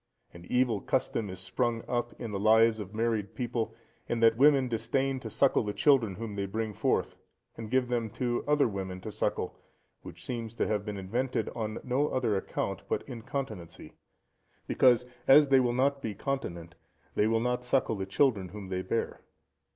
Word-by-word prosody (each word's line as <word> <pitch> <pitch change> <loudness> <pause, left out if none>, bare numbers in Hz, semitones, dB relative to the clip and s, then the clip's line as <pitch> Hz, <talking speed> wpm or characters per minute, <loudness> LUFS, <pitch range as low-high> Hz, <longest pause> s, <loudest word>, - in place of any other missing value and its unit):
An 85 0 -12
evil 125 -5 +2
custom 115 -5 -1
is 95 0 -6
sprung 115 +4 -1
up 120 -1 -2
in 115 - -5
the 100 - -3
lives 110 +1 +5
of 105 0 -7
married 110 -3 -1
people, 115 -3 -2 0.3
in 120 - 0
that 115 0 +6
women 135 0 +5
disdain 130 +4 -1
to - - -7
suckle 140 - +3
the 105 -1 -4
children 125 -10 +3
whom 110 0 -6
they 100 -1 -2
bring 110 +2 -3
forth, - - 0 0.4
and 115 -2 -7
give 130 +1 +2
them 120 -2 -1
to 120 +2 -2
other 150 -2 +4
women 95 -3 -5
to 110 - -6
suckle; - - -2 0.4
which - - -11
seems 115 -2 -5
to - - 0
have 105 -2 -1
been 105 -2 -4
invented 120 +7 -2
on 110 -2 -4
no 130 +4 +1
other 120 -7 0
account 95 0 -3
but - - -2
incontinency; 115 -8 -6 0.7
because, 125 -1 +4 0.2
as 145 +1 +7
they 135 -1 +6
will 125 -2 +2
not 135 +3 +1
be 110 -6 -4
continent, 85 - -4 0.4
they 105 - +2
will 115 0 +2
not 125 +1 -1
suckle 125 -2 +1
the 95 -1 -4
children 100 -5 +2
whom 100 0 -8
they 95 -1 -2
bear. 105 +5 -2
115 Hz, 180 wpm, -29 LUFS, 105-125 Hz, 0.7 s, as